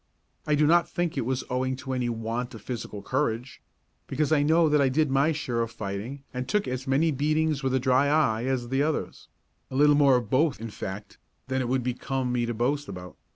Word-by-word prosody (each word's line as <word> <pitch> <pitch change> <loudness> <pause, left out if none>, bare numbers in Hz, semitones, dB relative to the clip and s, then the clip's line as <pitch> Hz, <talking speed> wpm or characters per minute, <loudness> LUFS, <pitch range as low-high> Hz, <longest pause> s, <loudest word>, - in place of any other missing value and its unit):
I 150 - +3
do 150 +1 +3
not 170 +3 +4
think 175 -2 -2
it 115 - -2
was 130 0 -1
owing 130 +1 -1
to 130 0 -5
any 125 -2 -1
want 115 +2 -3
of 110 - -11
physical 110 -4 -6
courage; 130 -2 -2 0.5
because 150 +3 -1
I 155 -2 +4
know 160 +3 +4
that 150 -1 +3
I 135 - +3
did 150 +1 +1
my 140 +4 +3
share 125 -6 -2
of 115 - -1
fighting 110 +7 -6
and 125 0 -4
took 210 -1 +1
as 130 +1 -4
many 145 +5 +3
beatings 155 +1 +1
with 130 -1 0
a - - +3
dry 130 +2 +3
eye 135 -6 +2
as 130 -2 -1
the 135 +2 +1
others; 155 +1 -2 0.4
a 130 - -7
little 145 +2 +5
more 140 -2 +5
of 120 -3 0
both, 140 +4 +2
in 115 0 -6
fact, 100 +1 -7 0.3
than 130 0 0
it 120 - -2
would 130 -1 +1
become 125 +1 -2
me 120 -1 0
to 120 - -2
boast 140 +5 0
about. 90 -2 -8
130 Hz, 225 wpm, -27 LUFS, 120-145 Hz, 0.5 s, little